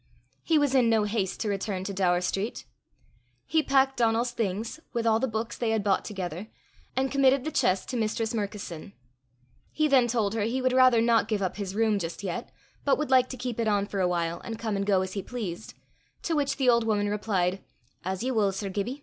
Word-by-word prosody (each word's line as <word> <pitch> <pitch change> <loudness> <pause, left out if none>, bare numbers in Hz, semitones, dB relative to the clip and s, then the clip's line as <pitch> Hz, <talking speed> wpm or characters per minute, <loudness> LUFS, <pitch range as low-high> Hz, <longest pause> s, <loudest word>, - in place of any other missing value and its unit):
He 325 - +2
was 290 -2 +2
in 250 -3 +4
no 220 -2 +3
haste 205 -3 -2
to 220 - -1
return 195 -1 -2
to 200 +1 -4
Daur 180 -2 +2
street. 195 +4 -3 0.8
He 320 - +2
packed 270 -2 +2
Donal's 235 +1 +2
things, 225 +3 -3
with 235 -1 -1
all 225 -1 +3
the 265 - 0
books 225 +1 -3
they 235 - 0
had 220 -2 +1
bought 195 -2 +2
together, 190 -1 -5 0.5
and 265 0 0
committed 275 -1 +3
the 315 - -3
chest 190 -10 +1
to 255 - -2
Mistress 220 0 -1
Murkison. 200 -5 -5 0.8
He 310 0 +1
then 265 -4 +4
told 220 -4 0
her 225 - -1
he 230 +5 0
would 255 0 +1
rather 255 -3 +6
not 230 -2 +3
give 210 -3 -1
up 185 - -2
his 195 -2 -4
room 220 -2 +2
just 170 +2 -5
yet, 195 +6 -4 0.3
but 280 - +3
would 300 -3 -3
like 255 -1 +5
to 255 - -6
keep 245 -2 -4
it 230 - +1
on 205 -1 +2
for 205 -1 -4
a 185 - +3
while, 170 -1 -1
and 225 -1 -5
come 220 -2 -2
and 200 0 -2
go 195 -2 +3
as 190 0 -6
he 200 - -3
pleased; 215 -5 -6 0.5
to 330 - 0
which 285 -2 0
the 265 -3 0
old 235 -1 +5
woman 210 -2 +1
replied, 195 -3 -1 0.4
"As 190 +3 -3
ye 260 - 0
wull, 210 -5 +2
Sir 195 +1 -4
Gibbie. 210 +8 -3
220 Hz, 225 wpm, -27 LUFS, 195-245 Hz, 0.8 s, rather